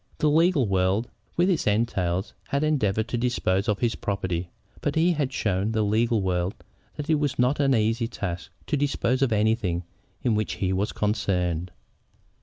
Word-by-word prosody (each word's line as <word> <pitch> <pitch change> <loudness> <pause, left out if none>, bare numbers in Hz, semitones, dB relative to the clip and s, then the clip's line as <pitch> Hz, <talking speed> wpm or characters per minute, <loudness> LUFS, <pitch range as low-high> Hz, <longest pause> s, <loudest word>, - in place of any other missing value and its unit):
The 150 - +2
legal 160 - +3
world, 95 +4 +1 0.3
with 175 +1 +4
its 180 - +1
entails, 100 -4 0
had 140 +2 0
endeavored 110 -8 +1
to 120 - -1
dispose 105 -6 0
of 105 - +2
his 120 -2 +2
property, 90 -4 -3 0.3
but - - -1
he 165 +3 +4
had 145 -5 -1
shown 105 -2 0
the 110 -1 +1
legal 110 +1 +2
world 90 +1 0 0.4
that 150 -1 -5
it 155 -2 +3
was 145 -2 -1
not 125 +4 +2
an 135 -2 +3
easy 115 +1 +1
task 90 -7 -5 0.2
to 150 - 0
dispose 140 -2 0
of 135 -3 +2
anything 105 -5 +1 0.4
in 120 - +2
which 105 -1 0
he 95 -1 -1
was 100 +3 0
concerned. 90 -5 0
110 Hz, 175 wpm, -26 LUFS, 95-135 Hz, 0.4 s, with